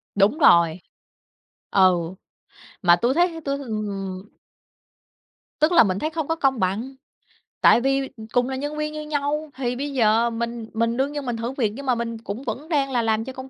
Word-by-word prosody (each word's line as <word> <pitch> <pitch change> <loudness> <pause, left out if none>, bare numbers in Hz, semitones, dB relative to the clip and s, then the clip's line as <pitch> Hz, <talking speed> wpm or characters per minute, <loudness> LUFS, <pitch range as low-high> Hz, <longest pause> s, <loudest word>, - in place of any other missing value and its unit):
Đúng 205 +9 +3
rồi. 170 - +5 0.9
Ừ. 185 -2 +5 0.8
Mà 175 -2 +6
tui 240 +8 +1
thấy 345 +3 +4
ha 330 -1 -8
tui, 275 0 -1
ừm 200 -6 -5 1.4
Tức 310 +3 +3
là 345 - +7
mình 195 -2 -1
thấy 310 - -1
không 320 -2 -4
có 325 - 0
công 270 -5 +1
bằng, 215 +9 -2 0.7
tại 235 - +6
vì 270 0 0 0.2
cùng 245 +1 +2
là 265 - -3
nhân 290 +3 -4
viên 305 0 -3
như 305 - -5
nhau 300 0 -2
thì 250 -2 -2
bây 280 +2 -4
giờ 230 -1 +3
mình 235 -1 -4
mình 230 +1 0
đương 270 +2 0
nhiên 290 -1 -5
mình 245 -2 -2
thử 235 +2 -3
việc, 235 -6 -1
nhưng 275 +2 -8
mà 250 -2 +2
mình 230 -1 -4
cũng 220 +3 -7
vẫn 300 +4 -5
đang 280 -4 +1
là 245 -2 +1
làm 225 0 0
cho 265 - -7
công 260 0 -9
250 Hz, 200 wpm, -23 LUFS, 220-285 Hz, 1.4 s, là